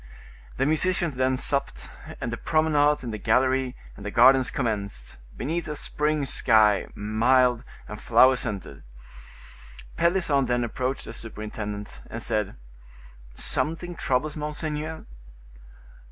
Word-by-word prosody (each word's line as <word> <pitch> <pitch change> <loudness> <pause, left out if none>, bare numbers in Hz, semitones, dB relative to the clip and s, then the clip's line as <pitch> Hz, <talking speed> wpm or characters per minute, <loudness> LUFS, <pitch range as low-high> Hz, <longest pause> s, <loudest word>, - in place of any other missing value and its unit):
The 135 - +1
musicians 160 0 0
then 130 0 +1
supped, 140 +1 -1 0.3
and 115 - -3
the - - -3
promenades 150 -1 +2
in 120 - -4
the 110 - -5
gallery 130 +1 +1 0.2
and 100 - -11
the 105 - -3
gardens 125 +3 +5
commenced, 100 - -4 0.2
beneath 165 +6 -2
a 150 - -4
spring 150 0 -1
sky, 110 -5 +3
mild 120 +3 +2 0.2
and - - -8
flower 130 0 +5
scented. 100 - -6 1.2
Pelisson 170 -7 +2
then 120 0 +1
approached 130 +3 -3
the 115 - -8
superintendent, 105 -2 -6
and - - -5
said: 105 -2 -1 0.8
"Something 165 - -1
troubles 150 -1 -1
monseigneur?" 150 +1 -4
130 Hz, 120 wpm, -25 LUFS, 115-150 Hz, 1.2 s, gardens